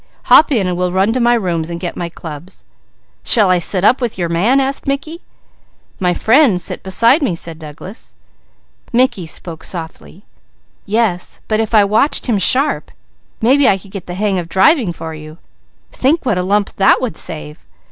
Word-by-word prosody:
Hop 310 - +5
in 220 -8 +1
and 180 -1 -2
we'll 180 0 -1
run 190 +4 +1
to 255 - -1
my 240 0 +3
rooms 175 -7 -2
and 170 0 -5
get 175 -1 -5
my 170 - -4
clubs." 160 +2 -10 0.6
"Shall 210 -6 +5
I 180 - +3
sit 185 +1 -3
up 250 +6 +3
with 235 -5 -3
your 175 -2 -2
man?" 205 +11 +2
asked 275 +1 -3
Mickey. 310 +5 -3 0.8
"My 180 -1 +1
friends 225 - +3
sit - - -6
beside 230 - +2
me," 245 - 0
said 165 -1 -7
Douglas. 160 - -11 0.8
Mickey 235 -8 +1
spoke 160 0 -8
softly: 170 +3 -8 0.6
"Yes, 205 -4 -1
but 215 0 0
if 225 0 -1
I 210 - +6
watched 215 +9 +1
him 225 -5 0
sharp, 270 +9 +1 0.5
maybe 265 +4 +4
I 195 - +2
could 195 0 -16
get 195 -3 -8
the 175 - -6
hang 195 -1 0
of 170 -1 -7
driving 195 - +3
for 160 -1 -8
you. 155 0 -11 0.5
Think 285 +5 0
what 215 -7 0
a - - +1
lump 200 +2 -1
that 195 - +4
would 255 -3 -4
save. 155 -3 -6
195 Hz, 185 wpm, -16 LUFS, 175-240 Hz, 0.8 s, I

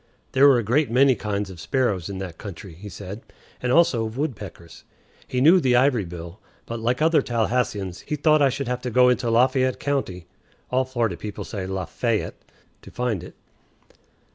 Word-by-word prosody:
There 135 +2 +6
were 135 -3 +6
a 120 - 0
great 135 +8 +1
many 130 +3 +5
kinds 100 -3 -3
of 90 - -11
sparrows 100 -5 -1
in 100 - -5
that 90 -4 -7
country, 95 -2 -9
he 100 +6 -10
said, 100 +3 -8 0.4
and 125 - 0
also 130 -7 +4
of 110 +2 -5
woodpeckers. 100 - -6 0.4
He 125 - -1
knew 165 +7 +7
the 130 -6 +2
ivory 125 -5 +3
bill, 85 +2 -9 0.3
but, 115 0 -5
like 125 +6 0
other 160 -2 +4
Tallahasseans, 110 -6 -1
he 150 - -1
thought 155 +1 +3
I 140 - +5
should 135 0 -4
have 125 0 -2
to 125 - -3
go 125 +2 +5
into 125 -1 +1
Lafayette 130 +2 +2
County 130 -12 -2 0.5
(all 130 +1 +2
Florida 120 -8 -1
people 105 +4 -6
say 95 -4 -5
La_fay_ette) 95 +4 -2 0.5
to - - -13
find 115 -8 -2
it. - - -11
120 Hz, 185 wpm, -23 LUFS, 100-130 Hz, 0.5 s, knew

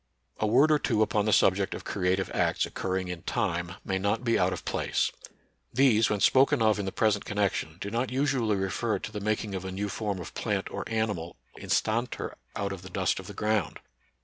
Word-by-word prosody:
A 110 - +1
word 135 +8 +5
or 150 - +4
two 110 -5 +2
upon 105 -1 +1
the 110 - +2
subject 95 -1 +3
of - - -7
creative 95 0 0
acts - - +1
occurring 95 0 -2
in 90 -1 -5
time 90 -1 -2
may 95 -1 -1
not 100 +5 0
be 115 -2 +2
out 90 +1 +3
of 95 - -5
place. - - 0 0.6
These, 115 -4 +4
when 105 - 0
spoken 135 +1 +5
of 110 -2 +3
in 100 - -2
the 95 - -2
present 105 -1 +1
connec 105 -1 0
tion, 80 +1 -5
do 100 - -5
not 120 +3 0
usually 130 -5 +1
refer 95 +4 -1
to 105 - -7
the 105 - -4
making 105 0 -1
of 95 -1 -3
a 95 - -5
new 100 +2 -3
form 100 +1 -2
of 90 - -8
plant - - -2
or - - -5
animal 105 -7 -2 0.2
instanter 115 +3 -1 0.2
out 100 -1 -2
of 95 -2 -6
the 95 - -10
dust - - 0
of - - -9
the - - -9
ground. 110 -1 0
105 Hz, 215 wpm, -28 LUFS, 95-110 Hz, 0.6 s, word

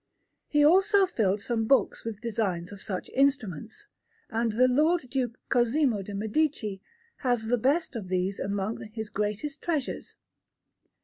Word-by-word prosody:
He 295 -1 +4
also 385 +4 +5
filled 210 - 0
some 225 +1 -1
books 270 +4 +2
with 220 -2 -6
designs 205 -7 -2
of 200 -2 -9
such 185 -3 -4
instruments; 270 - 0 0.5
and 230 0 0
the 250 +3 +4
Lord 310 +7 +3
Duke 250 -4 -1
Cosimo 240 -2 +2
de' 200 +1 -7
Medici 215 -2 -1 0.4
has 245 -4 0
the 245 +2 +2
best 280 +5 +1
of 210 -5 -5
these 185 +1 -1
among 200 +2 -2
his 220 -2 -5
greatest 210 +9 -3
treasures. 305 -6 -3
230 Hz, 140 wpm, -28 LUFS, 205-280 Hz, 0.5 s, also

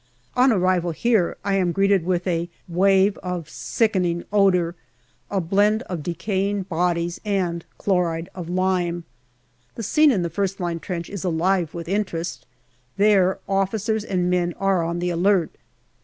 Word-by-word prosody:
On 255 +1 +5
arrival 185 -4 +1
here 220 -1 +1
I 200 - +1
am 180 -2 +1
greeted 195 0 +2
with 180 -1 0
a 170 -2 -1 0.2
wave 195 +3 +3
of 180 -4 -4
sickening 180 -5 0
odour, 180 -4 +3 0.6
a 200 - 0
blend 205 +6 +2
of 180 -8 -5
decaying 195 +4 -1
bodies 175 -1 -1
and 185 -5 -1
chloride 175 -4 0
of 175 -3 -7
lime. 180 -2 0 0.7
The 230 - -5
scene 305 +8 +4
in 200 -10 +1
the 170 - -2
first 195 +2 -2
line 170 -2 -2
trench 170 -1 -5
is 200 -3 -6
alive 175 -1 0
with 170 -1 -6
interest; 185 -3 -3 0.5
there 195 -2 +4
officers 205 +3 0
and 180 -3 -1
men 175 -1 0
are 195 -2 +2
on 170 +1 -2
the 175 0 -1
alert. 175 0 +2
185 Hz, 150 wpm, -23 LUFS, 175-200 Hz, 0.7 s, On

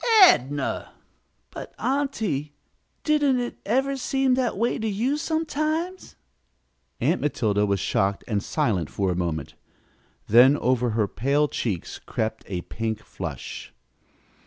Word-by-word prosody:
"Adnah!" 140 - +3 0.6
"But, - - -9
aunty, 220 - -1 0.5
didn't 290 -4 +3
it 240 0 -4
ever 270 +5 +1
seem 270 0 +1
that 250 -4 0
way 235 +3 0
to 220 - -1
you, 225 +7 0
sometimes?" 320 +3 -2 0.8
Aunt 155 +9 +1
Matilda 105 -8 +1
was 100 -1 +1
shocked 95 +2 0
and 105 -3 0
silent 90 -9 0
for 95 -2 -1
a - - -1
moment, 85 -4 -3 0.7
then 125 +6 +6
over 125 -1 +1
her 105 -3 +2
pale 140 +8 +1
cheeks 100 - -3
crept 110 0 -3
a 90 -3 -3
pink 110 +3 -4
flush. - - -7
145 Hz, 125 wpm, -25 LUFS, -, 0.8 s, then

